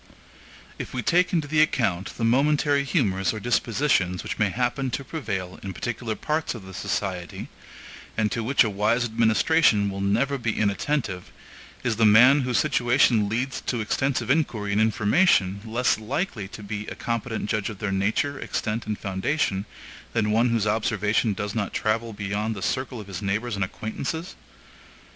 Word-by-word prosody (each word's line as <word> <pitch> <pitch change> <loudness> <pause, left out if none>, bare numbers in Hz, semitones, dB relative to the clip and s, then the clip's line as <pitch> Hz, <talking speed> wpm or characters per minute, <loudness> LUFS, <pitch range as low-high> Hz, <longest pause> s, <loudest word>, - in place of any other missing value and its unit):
If - - -6
we 125 - -2
take 180 +6 +3
into 160 -4 0
the 155 +1 +3
account 100 - 0
the 115 - -3
momentary 140 +4 +3
humors 100 - +1
or - - -4
dispositions 115 - +1
which - - -5
may 105 -2 +3
happen 125 +5 -1
to 135 +3 -3
prevail 100 - -4
in 95 -1 -6
particular 115 +2 -3
parts 155 +1 -2
of 105 -5 -9
the 95 - -10
society, 90 -2 -3 0.7
and 110 -1 +1
to 115 - -2
which 135 +4 +4
a 110 - 0
wise 105 +4 +1
administration 110 0 +3
will 95 0 -5
never 120 +8 +1
be 115 -2 -2
inattentive, 105 -1 -1 0.5
is 115 -3 0
the 115 - +4
man 125 +7 +7
whose 125 -3 0
situation 120 -1 +3
leads 125 +4 -2
to 120 - 0
extensive 130 +5 0
inquiry 115 -9 0
and 105 +2 +2
information 110 - +3
less 115 +1 +1
likely 110 - -3
to 105 +2 -10
be 105 +1 -5
a - - -6
competent 115 -2 -3
judge 105 -1 -1
of 110 - -7
their 100 0 -3
nature, 110 +9 0
extent, 110 0 -3
and 105 -1 -2
foundation 95 +1 -1 0.5
than 105 -2 +1
one 115 +3 +3
whose 115 -3 +1
observation 105 0 +1
does 105 +1 -4
not 110 -3 -2
travel 115 +1 0
beyond 105 +2 -3
the 95 - -6
circle 130 -2 -2
of 105 - -8
his 100 0 -7
neighbors 110 +4 -1
and 100 - -1
acquaintances? 135 - -5
110 Hz, 170 wpm, -25 LUFS, 100-130 Hz, 0.7 s, man